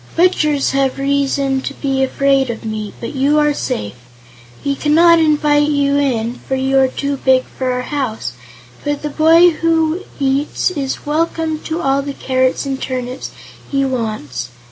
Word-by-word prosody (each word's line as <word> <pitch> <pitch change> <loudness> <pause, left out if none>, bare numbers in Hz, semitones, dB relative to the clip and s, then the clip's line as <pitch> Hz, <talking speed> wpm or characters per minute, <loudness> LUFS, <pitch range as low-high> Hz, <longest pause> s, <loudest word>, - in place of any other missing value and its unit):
Butchers 305 -5 +2
have 270 -1 0
reason 275 -1 0
to 275 - -5
be 270 -2 -1
afraid 270 0 +2
of 230 -1 -5
me, 215 -1 -4
but 235 - -6
you 280 +2 +2
are 295 -1 +3
safe. 105 - -3 0.7
We 280 - +1
cannot 330 +4 +5
invite 295 -1 +3
you 285 -1 +1
in, 240 -4 -1
for 265 - 0
you 265 +1 +2
are 265 - +4
too 280 +2 -3
big 260 -1 +3
for 260 -1 -4
our 250 0 -2
house, 245 - -3 0.5
but 290 0 -2
the 300 - -3
boy 330 +3 +5
who 325 +1 +1 0.2
eats 275 +5 0
is 275 -6 -4
welcome 315 +1 -1
to 325 +2 -3
all 275 0 +2
the 280 0 -5
carrots 260 0 0
and 270 -1 -3
turnips 255 0 -4 0.4
he 275 -1 +1
wants. 215 - -3
275 Hz, 165 wpm, -17 LUFS, 260-300 Hz, 0.7 s, cannot